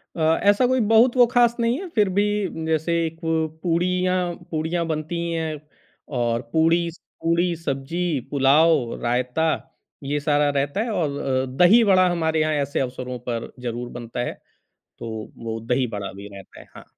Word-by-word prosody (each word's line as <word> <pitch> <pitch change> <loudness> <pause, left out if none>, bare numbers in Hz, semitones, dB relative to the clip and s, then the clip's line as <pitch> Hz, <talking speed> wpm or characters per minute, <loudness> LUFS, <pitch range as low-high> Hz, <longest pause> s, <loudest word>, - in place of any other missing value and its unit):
अ, - - -7 0.3
ऐसा 205 +5 +4
कोई 260 +1 +2
बहुत 230 +3 +5
वो 245 - +8
ख़ास 240 -1 +4
नहीं 235 +2 +1
है 380 - -6
फिर 210 -3 +3
भी 200 +2 +2 0.4
जैसे 160 +1 0
एक 165 0 -5
वो 160 -1 +1 0.2
पूड़ियाँ 180 +1 +1 0.2
पूड़ियाँ 165 +2 -1
बनती 155 +1 -3
ही 170 0 -2
हैं 160 -2 -3 0.6
और 120 -1 0
पूड़ी, 165 +1 +3
स 170 - -16 0.3
पूड़ी, 170 +1 +1
सब्ज़ी, 165 +1 -2
पुलाव, 140 -1 +3
रायता 125 +6 0 0.5
ये 145 +2 -1
सारा 145 0 +2
रहता 140 +4 -1
है 235 - -2
और 155 -8 -1
अ, 130 -1 0
दही-वड़ा 190 0 +6
हमारे 160 -2 0
यहाँ 155 0 +1
ऐसे 145 0 -1
अवसरों 125 -1 -4
पर 115 -1 -4
ज़रूर 120 0 -4
बनता 120 0 -7
है, 120 - -2 0.7
तो 110 -2 -6
वो 115 0 -3
दही-बड़ा 115 -4 -2
भी 100 +1 -10
रहता 95 -1 -13
है, - - -14
हाँ। - - -12
160 Hz, 165 wpm, -23 LUFS, 130-175 Hz, 0.7 s, वो